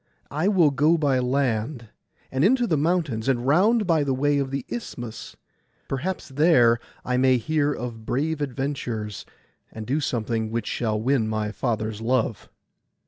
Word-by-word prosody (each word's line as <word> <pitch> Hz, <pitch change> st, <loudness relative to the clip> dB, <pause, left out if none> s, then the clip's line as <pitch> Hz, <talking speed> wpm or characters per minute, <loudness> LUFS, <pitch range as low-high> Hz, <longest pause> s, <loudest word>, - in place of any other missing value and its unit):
I 155 Hz, +6 st, 0 dB
will 180 Hz, -8 st, +4 dB
go 150 Hz, +4 st, +3 dB
by 140 Hz, -4 st, +2 dB
land, 125 Hz, -2 st, -1 dB, 0.4 s
and 130 Hz, +2 st, 0 dB
into 245 Hz, +5 st, +4 dB
the 175 Hz, -8 st, +1 dB
mountains, 150 Hz, -7 st, 0 dB
and 120 Hz, -2 st, 0 dB
round 205 Hz, -, +3 dB
by 165 Hz, -4 st, +2 dB
the 135 Hz, -2 st, 0 dB
way 145 Hz, +2 st, +2 dB
of 135 Hz, -1 st, -1 dB
the 135 Hz, -1 st, -4 dB
Isthmus. 120 Hz, -, -7 dB, 0.5 s
Perhaps 160 Hz, +6 st, -3 dB
there 130 Hz, -5 st, +4 dB, 0.3 s
I 125 Hz, 0 st, 0 dB
may 130 Hz, 0 st, +4 dB
hear 150 Hz, +4 st, 0 dB
of 120 Hz, -4 st, -5 dB
brave 150 Hz, +6 st, -1 dB
adventures, 125 Hz, -6 st, -4 dB, 0.4 s
and 110 Hz, -1 st, -7 dB
do 135 Hz, +7 st, 0 dB
something 115 Hz, -5 st, -1 dB
which 115 Hz, -1 st, -2 dB
shall 110 Hz, -3 st, -1 dB
win 120 Hz, -1 st, +1 dB
my 110 Hz, -1 st, -2 dB
father's 110 Hz, -1 st, -2 dB
love. 115 Hz, -4 st, -1 dB
130 Hz, 155 wpm, -24 LUFS, 115-150 Hz, 0.5 s, will